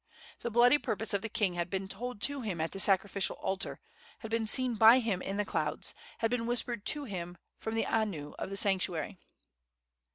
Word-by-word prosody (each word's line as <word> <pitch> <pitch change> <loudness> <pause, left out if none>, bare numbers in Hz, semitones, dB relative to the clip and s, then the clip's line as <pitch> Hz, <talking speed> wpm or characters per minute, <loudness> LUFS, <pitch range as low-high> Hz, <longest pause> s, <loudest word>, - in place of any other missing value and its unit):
The 235 - -3
bloody 245 +5 +5
purpose 220 -3 -1
of 200 - +1
the 225 - -4
king 210 -5 +1
had 175 0 -2
been 190 0 -2
told 215 +2 -5
to 285 -1 +1
him 200 -8 -3
at 160 +1 -1
the 195 - -6
sacrificial 195 0 +3
altar, 190 0 -3 0.4
had 225 - -7
been 225 -1 0
seen 255 +2 +3
by 225 +2 +8
him 220 -7 0
in 195 - -3
the 210 - 0
clouds, - - -2 0.2
had 225 - 0
been 235 -2 0
whispered 240 -2 -1
to 295 -1 -1
him 175 -7 -6 0.2
from 220 0 -4
the 225 - +1
anu 195 -10 -1
of - - -4
the 195 - -4
sanctuary. 190 -2 0
210 Hz, 200 wpm, -31 LUFS, 190-235 Hz, 0.4 s, by